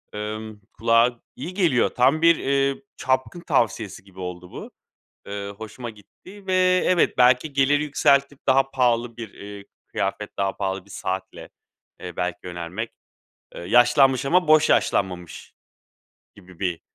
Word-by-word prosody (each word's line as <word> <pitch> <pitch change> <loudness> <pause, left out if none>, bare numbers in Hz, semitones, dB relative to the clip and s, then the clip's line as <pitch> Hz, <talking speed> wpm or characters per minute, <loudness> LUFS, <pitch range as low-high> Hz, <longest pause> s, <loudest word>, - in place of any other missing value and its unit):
ımm, 105 0 -6
kulağa 115 +1 +2 0.2
iyi 165 +8 -7
geliyor. 170 - +2
Tam 135 +6 +2
bir, 170 0 +6
eee, 140 +3 0
çapkın 130 +6 -1
tavsiyesi 115 - -1
gibi 95 -1 -17
oldu 90 -1 -7
bu. - - -9 0.6
Eee, 100 0 -5
hoşuma 115 +2 -7
gitti 185 - -16
ve 185 -1 +3
evet, 180 -7 +2
belki 125 +4 +4
gelir 140 +1 +3
yükseltip 140 -1 +2
daha 135 0 +3
pahalı 120 -2 +1
bir, 115 -4 -8
eee, 100 0 -10 0.2
kıyafet, - - -3
daha 95 -1 -1
pahalı 95 -1 -3
bir 100 - -21
saatle, 95 0 -5 0.5
eee, 90 -2 -8
belki 90 -2 -2
yönelmek. 90 +5 -5 0.6
Eee, - - -8
yaşlanmış 120 +7 +4
ama 180 +3 +2
boş 155 0 +5
yaşlanmamış 90 -5 -1 0.8
gibi 95 -3 -17
bir 90 -4 -2
120 Hz, 140 wpm, -23 LUFS, 100-140 Hz, 0.8 s, bir